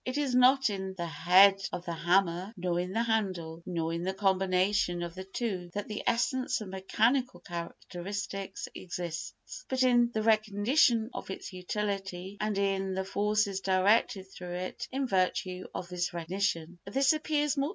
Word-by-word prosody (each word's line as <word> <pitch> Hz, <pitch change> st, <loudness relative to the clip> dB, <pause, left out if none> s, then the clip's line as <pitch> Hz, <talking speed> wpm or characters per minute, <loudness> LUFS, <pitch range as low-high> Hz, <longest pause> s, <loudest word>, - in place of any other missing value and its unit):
It 255 Hz, +2 st, -3 dB
is 285 Hz, -3 st, 0 dB
not 255 Hz, -1 st, +5 dB
in 190 Hz, -1 st, -4 dB
the 175 Hz, -2 st, -3 dB
head 185 Hz, +5 st, +5 dB
of 175 Hz, -, -5 dB
the 170 Hz, -, -3 dB
hammer, 180 Hz, +4 st, +1 dB
nor 175 Hz, -1 st, -1 dB
in 180 Hz, +1 st, -2 dB
the 225 Hz, +4 st, +1 dB
handle, 185 Hz, -8 st, -1 dB
nor 165 Hz, -2 st, -1 dB
in 170 Hz, -, -2 dB
the 190 Hz, +2 st, -2 dB
combination 190 Hz, -2 st, +2 dB
of 170 Hz, -1 st, -5 dB
the 185 Hz, +1 st, -7 dB
two 190 Hz, -3 st, -3 dB
that 205 Hz, -, -3 dB
the 210 Hz, -, -4 dB
essence 255 Hz, +2 st, +1 dB
of 215 Hz, -3 st, -7 dB
mechanical 220 Hz, +4 st, +1 dB
characteristics 190 Hz, +3 st, -5 dB
exists, 175 Hz, -, -6 dB
but 260 Hz, 0 st, +2 dB
in 240 Hz, -2 st, +4 dB
the 220 Hz, -2 st, -1 dB
recognition 220 Hz, +2 st, +3 dB
of -, -, -7 dB
its 190 Hz, -, -6 dB
utility 195 Hz, 0 st, -3 dB
and 210 Hz, -1 st, 0 dB
in 195 Hz, -1 st, 0 dB
the 190 Hz, 0 st, -2 dB
forces 205 Hz, 0 st, +1 dB
directed 195 Hz, +1 st, +2 dB
through 175 Hz, -1 st, -6 dB
it 185 Hz, +1 st, -5 dB
in 270 Hz, +1 st, -1 dB
virtue 185 Hz, -3 st, 0 dB
of 175 Hz, -, -5 dB
this 180 Hz, -1 st, -2 dB
recognition. 175 Hz, -1 st, -2 dB
190 Hz, 155 wpm, -30 LUFS, 180-215 Hz, -, not